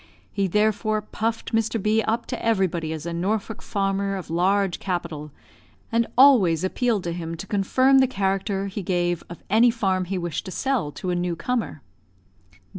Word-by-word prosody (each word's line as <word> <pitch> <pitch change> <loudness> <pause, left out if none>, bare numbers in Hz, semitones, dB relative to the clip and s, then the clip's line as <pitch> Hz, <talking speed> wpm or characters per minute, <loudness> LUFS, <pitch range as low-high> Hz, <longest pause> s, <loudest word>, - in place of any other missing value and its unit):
He 195 -1 +1
therefore 215 +2 +1
puffed 225 +2 -3
Mr. 225 0 +1
B 215 +2 +2
up 225 +1 -1
to 245 - -5
everybody 185 -7 0
as 160 0 -5
a 170 - -3
Norfolk 200 +5 -2
farmer 195 -1 -1
of 185 -4 -7
large 190 +2 +1
capital, 170 -5 -4 0.6
and 230 0 +2
always 210 - +6
appealed 220 +1 0
to 170 - -3
him 165 -1 -5
to 190 - -7
confirm 255 +7 +3
the 265 - +4
character 195 -3 -1
he 200 +1 -4
gave 175 -2 -1
of 170 - -10
any 225 +4 +5
farm 190 -6 0
he 190 +2 -3
wished 170 -3 -3
to 190 - -6
sell 260 - -1
to 180 +6 -4
a - - 0
new 175 -1 -1
comer. 220 - -3
195 Hz, 175 wpm, -24 LUFS, 175-220 Hz, 0.6 s, always